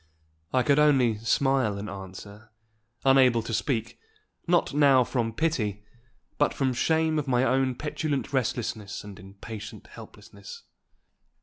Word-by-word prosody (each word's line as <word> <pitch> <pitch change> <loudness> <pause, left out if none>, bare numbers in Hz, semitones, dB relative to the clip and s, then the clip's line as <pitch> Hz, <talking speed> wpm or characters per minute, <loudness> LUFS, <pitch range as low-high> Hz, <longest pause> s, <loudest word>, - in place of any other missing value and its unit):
I 130 -1 +2
could 140 +2 +3
only 130 -7 +3
smile 125 -1 +1
an 100 +1 -6
answer, 100 +2 -10 0.6
unable 130 -4 +5
to 115 - -5
speak, 115 0 -2 0.5
not 175 -4 +2
now 140 -3 +5
from 115 -1 -2
pity, 110 -8 -2 0.5
but - - +2
from 130 -2 0
shame 160 +4 +1
of 145 - -4
my 125 -1 +2
own 130 0 +1
petulant 150 -1 -3
restlessness 110 -5 -2
and 100 -2 -11
impatient 100 +3 -10
helplessness. 470 -1 -13
125 Hz, 125 wpm, -26 LUFS, 110-140 Hz, 0.6 s, unable